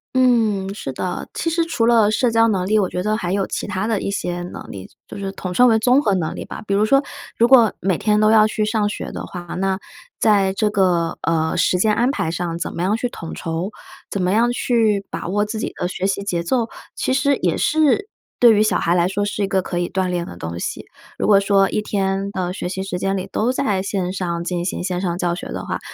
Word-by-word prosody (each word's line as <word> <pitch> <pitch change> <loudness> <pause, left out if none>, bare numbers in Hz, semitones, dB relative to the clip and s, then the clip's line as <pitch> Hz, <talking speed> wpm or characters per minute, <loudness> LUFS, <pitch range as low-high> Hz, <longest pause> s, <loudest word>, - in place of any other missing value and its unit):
嗯， 220 -7 +2
是 170 -9 -5
的。 180 +7 -4
其 330 - -1
实 335 +1 +1
除 325 -9 0
了 230 -3 +5
社 235 +2 +2
交 225 0 +4
能 190 -5 0
力， 215 +3 +3
我 190 -3 +1
觉 180 - -3
得 215 +1 +1
还 180 -4 -2
有 195 -1 +1
其 - - -4
他 200 0 -2
的 220 -4 0
一 - - -2
些 175 -3 -3
能 175 - -8
力， 95 -2 -9 0.2
就 - - -9
是 195 -1 -4
统 185 -2 -5
称 250 +7 +5
为 225 -2 +5
综 250 +5 +4
合 205 -9 +1
能 165 -4 -2
力 - - -5
吧。 - - -8
比 200 - -1
如 205 +2 +3
说， 275 +5 +4 0.3
如 235 - +5
果 240 -4 +6
每 185 -3 0
天 210 -1 +2
都 215 0 +4
要 215 -1 +6
去 215 0 -1
上 215 -1 +1
学 - - -5
的 - - -6
话， 180 - -7
那 190 +1 -1 0.4
在 200 -3 +3
这 210 +2 +1
个， 180 -5 +1
呃， 160 -1 0
时 180 - +2
间 215 +4 +2
安 240 +4 +2
排 165 - -1
上 170 -1 -3
怎 170 - -4
么 170 - -3
样 190 +4 +1
去 245 +1 -2
统 165 -7 -8
筹， 165 +3 -3 0.4
怎 200 - -2
么 180 - +1
样 230 +4 +3
去 225 -5 +1
把 165 - -4
握 205 +3 +1
自 215 +1 -4
己 - - -3
的 175 - -2
学 185 +1 -2
习 200 0 -1
节 180 -4 -1
奏， 230 +7 0 0.3
其 - - -1
实 280 +1 +2
也 - - 0
是 315 +6 +2 0.3
对 240 -2 +7
于 210 - +3
小 215 - +2
孩 170 - +1
来 175 0 +3
说 205 +2 -1
是 205 0 -2
一 - - 0
个 190 -1 +1
可 175 -1 -3
以 175 - -1
锻 190 -1 -1
炼 175 -1 -2
的 - - -9
东 85 0 -5
西。 - - -4 0.3
如 - - -1
果 205 -2 +6
说 195 -1 +3
一 - - -1
天 195 -1 -1
的 185 -2 -2
学 185 - -4
习 190 +1 -4
时 195 -2 -4
间 195 +1 0
里， 185 - -4
都 230 +4 +1
在 210 -7 0
线 190 -2 -2
上 170 -3 -3
进 175 0 -2
行 175 - -3
线 180 -1 -2
上 175 -2 -1
教 175 -1 0
学 - - -7
的 - - -5
话， - - -3
195 Hz, 275 characters per minute, -20 LUFS, 180-220 Hz, 0.4 s, 对